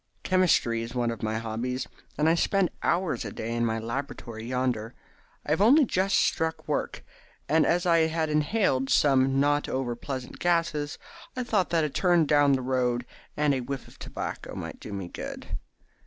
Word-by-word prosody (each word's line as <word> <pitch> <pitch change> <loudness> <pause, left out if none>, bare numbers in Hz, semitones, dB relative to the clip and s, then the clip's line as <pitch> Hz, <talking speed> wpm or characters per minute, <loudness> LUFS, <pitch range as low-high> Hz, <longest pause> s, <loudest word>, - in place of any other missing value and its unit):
Chemistry 170 -11 +2
is 115 +2 -6
one 120 -1 +1
of 115 - -7
my 110 0 -1
hobbies, 115 +3 -3 0.3
and 150 +2 +2
I 165 - +5
spend 190 +2 +2
hours 175 -6 0
a 105 - -5
day 115 +3 -4
in 120 0 0
my 110 0 -1
laboratory 115 -1 -5
yonder. 125 -2 -1 0.5
I - - -3
have 160 - +2
only 270 +8 +6
just 190 -3 +1
struck 160 0 0
work, - - -2 0.4
and 160 +1 +3
as 175 +2 +2
I 165 -2 +4
had 160 0 -1
inhaled 150 -3 +1
some 135 -1 +4
not 145 +1 +2
over 130 -2 -2
pleasant 130 +1 -6
gases, 165 -4 0 0.4
I 250 - 0
thought 215 -6 +1
that 165 -2 +2
a 150 - 0
turn 175 -1 +3
down 145 -1 +4
the 130 -1 0
road 125 -1 0 0.3
and 150 -1 +3
a 130 - -1
whiff 135 +1 -5
of - - -17
tobacco - - -6
might - - -6
do - - -9
me 100 -3 -4
good. - - -7
140 Hz, 185 wpm, -27 LUFS, 120-165 Hz, 0.5 s, only